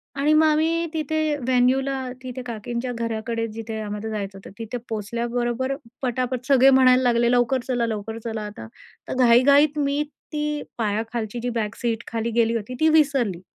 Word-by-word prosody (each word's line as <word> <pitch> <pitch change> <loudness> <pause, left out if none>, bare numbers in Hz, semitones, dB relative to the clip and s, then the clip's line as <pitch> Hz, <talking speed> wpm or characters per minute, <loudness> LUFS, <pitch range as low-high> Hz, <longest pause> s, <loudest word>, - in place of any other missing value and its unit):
आणि 285 +3 +2
मग 310 +1 +5
आम्ही 320 +2 +2
तिथे 310 0 0
व्हेन्यूला, 260 +1 +1 0.2
तिथे 255 0 -6
काकींच्या 235 +2 -4
घराकडे 230 0 -2
जिथे 225 0 -6
आम्हा 210 0 -4
जायचं 200 -2 -4
होतं. 195 - -12
तिथे 230 +2 -4
पोचल्याबरोबर 240 +4 -2 0.3
पटापट 255 0 -2
सगळे 270 -1 +6
म्हणायला 260 -1 +6
लागले, 240 -1 +3
"लवकर 245 +1 +2
चला, 245 -2 0
लवकर 220 0 -4
चला," 225 -2 -4
आता 205 - -8 0.4
तर - - -3
घाईघाईत 275 +4 +5
मी 285 +1 +1 0.3
ती 300 -1 -2 0.2
पायाखालची 225 +1 -2
जी 245 +1 -2
बॅक 210 -3 -2
सीट 235 -1 -1
खाली 230 0 -2
गेली 230 0 +3
होती 230 +2 -4
ती 315 - +4
विसरली. 275 - +2
245 Hz, 160 wpm, -23 LUFS, 225-270 Hz, 0.4 s, सगळे